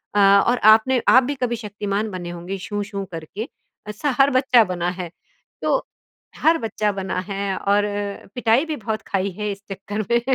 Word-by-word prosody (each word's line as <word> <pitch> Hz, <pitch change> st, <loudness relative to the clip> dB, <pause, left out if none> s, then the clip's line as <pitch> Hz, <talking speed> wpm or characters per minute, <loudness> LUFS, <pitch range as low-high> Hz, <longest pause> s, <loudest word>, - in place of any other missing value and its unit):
अ, -, -, +4 dB, 0.3 s
और 245 Hz, -, +2 dB, 0.2 s
आपने 245 Hz, +3 st, +2 dB
आप 255 Hz, 0 st, +7 dB
भी 285 Hz, +3 st, -2 dB
कभी 245 Hz, -2 st, -1 dB
शक्तिमान 210 Hz, -1 st, -3 dB
बने 175 Hz, -2 st, -6 dB
होंगे, 175 Hz, +3 st, -5 dB
शू-शू 205 Hz, +1 st, -4 dB
करके 165 Hz, +8 st, -6 dB, 0.4 s
ऐसा 250 Hz, +8 st, -2 dB
हर 275 Hz, +1 st, +6 dB
बच्चा 255 Hz, -3 st, +5 dB
बना 180 Hz, -2 st, -2 dB
है, 175 Hz, -2 st, -5 dB, 0.5 s
तो -, -, +2 dB, 0.6 s
हर 325 Hz, +1 st, +4 dB
बच्चा 215 Hz, -2 st, -1 dB
बना 190 Hz, -2 st, -3 dB
है 195 Hz, -1 st, -2 dB
और 205 Hz, +1 st, +2 dB, 0.5 s
पिटाई 245 Hz, +4 st, +3 dB
भी 310 Hz, -2 st, -3 dB
बहुत 220 Hz, -2 st, -4 dB
खाई 195 Hz, 0 st, -1 dB
है 210 Hz, -1 st, -1 dB
इस 200 Hz, 0 st, -8 dB
चक्कर 205 Hz, +2 st, -4 dB
में, 235 Hz, 0 st, +4 dB
210 Hz, 175 wpm, -22 LUFS, 195-235 Hz, 0.6 s, आप